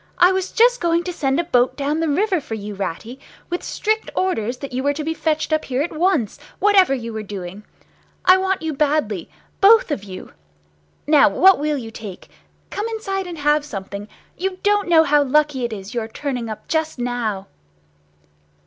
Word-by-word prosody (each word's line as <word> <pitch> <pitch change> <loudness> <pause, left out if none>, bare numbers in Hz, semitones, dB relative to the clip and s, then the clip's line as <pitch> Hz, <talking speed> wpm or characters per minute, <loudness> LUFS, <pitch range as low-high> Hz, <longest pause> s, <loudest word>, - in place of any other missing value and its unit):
"I 355 +1 +6
was 380 0 -2
just - - +4
going 340 0 +2
to 360 - -4
send 270 -3 0
a - - +1
boat 250 -6 +1
down 290 +2 -1
the 325 -1 0
river 370 +3 +1
for 225 - -6
you, 210 -1 -6
Ratty, 200 +6 -5 0.3
with 350 - -2
strict 435 +1 -1
orders 250 - -1
that 275 0 -8
you 255 - -1
were 285 +1 0
to 305 - -4
be 320 +2 -1
fetched 315 -1 -1
up 310 - +1
here 260 +2 -1
at 330 - -5
once, 310 - +1 0.2
whatever 390 -8 +4
you 230 -3 -6
were 220 - -4
doing. 195 -1 -7 0.6
I 370 +1 +7
want 380 -2 -1
you 320 -1 -2
badly—both 305 - +2
of 245 -9 -2
you. 185 -2 -10 0.7
Now 295 -6 +5
what 375 - +5
will 300 0 0
you 225 -4 -7
take? 210 -5 -9 0.4
Come 415 +2 -3
inside 390 -4 -3
and 345 -2 -7
have 295 0 +2
something! 200 -5 -7 0.3
You 375 +1 -3
don't 410 -2 +2
know 325 -2 +6
how 295 -1 +3
lucky 285 -2 +1
it 235 - -4
is, 200 -1 -7
your 230 -2 -2
turning 245 -1 -4
up 215 - -8
just 315 -2 -1
now!" 240 -5 -2
295 Hz, 190 wpm, -21 LUFS, 230-355 Hz, 0.7 s, I